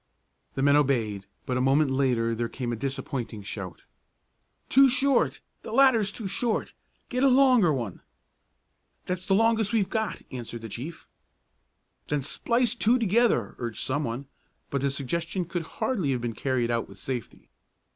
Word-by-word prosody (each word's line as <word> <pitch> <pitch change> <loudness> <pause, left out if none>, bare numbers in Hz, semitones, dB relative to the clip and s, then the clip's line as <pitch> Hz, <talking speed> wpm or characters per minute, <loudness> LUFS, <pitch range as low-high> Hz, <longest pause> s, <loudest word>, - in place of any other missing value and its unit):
The 135 - -1
men 140 0 +5
obeyed 115 -9 +1 0.2
but 125 - -1
a - - +1
moment 135 +2 +3
later 125 -4 +1
there 115 0 -2
came 120 -2 -3
a - - -1
disappointing 130 -3 -4
shout: 100 -2 -7 0.8
"Too 270 +1 +6
short! 270 +2 +2 0.2
The - - -8
ladder's 230 -5 +4
too 220 - -7
short! 225 +3 -1 0.4
Get 250 +1 0
a - - +7
longer 255 - +5
one!" 115 -10 -3 1.0
"That's 180 0 -3
the 195 - +4
longest 225 0 +2
we've 200 -4 +1
got!" 220 -3 -2
answered 120 -2 -7
the 115 - -6
chief. 135 +11 -7 1.0
"Then 150 -1 0
splice 240 - +1
two 240 0 +3
together!" 225 - +2
urged 115 -3 -4
some 145 +3 -1
one, 120 +2 -4 0.5
but 140 - -1
the 140 - +1
suggestion 170 +7 -2
could 175 0 -3 0.2
hardly 195 - 0
have 125 - -2
been 120 -1 -2
carried 120 0 0
out 115 -1 -1
with - - -13
safety. 125 -5 -6
140 Hz, 160 wpm, -27 LUFS, -, 1.0 s, a